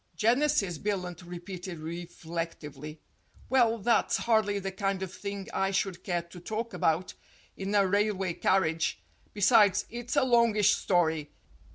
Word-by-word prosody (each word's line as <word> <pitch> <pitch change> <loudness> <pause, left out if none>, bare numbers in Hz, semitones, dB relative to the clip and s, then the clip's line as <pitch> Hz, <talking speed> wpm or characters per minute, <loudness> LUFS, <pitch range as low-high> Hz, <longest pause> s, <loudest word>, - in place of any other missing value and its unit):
"Genesis," 230 - +2
Billunt 180 -4 -3
repeated 180 0 -7
reflectively. 160 -2 -6 0.5
"Well, 240 -3 +3
that's 230 +1 +2
hardly 220 -3 +2
the 195 -1 -3
kind 195 0 -2
of 190 -1 -6
thing 200 -1 -6
I 195 - +1
should 195 -2 -2
care 175 -3 -1
to 170 +1 -13
talk 220 +5 -4
about 165 +1 0 0.4
in 195 +2 -3
a 200 -1 +5
railway 195 -2 +1
carriage. 165 - +1 0.3
Besides, 205 -1 +4
it's 240 +2 -4
a 285 - +4
longish 230 -5 +4
story. 160 -5 +1
195 Hz, 135 wpm, -29 LUFS, 175-215 Hz, 0.5 s, a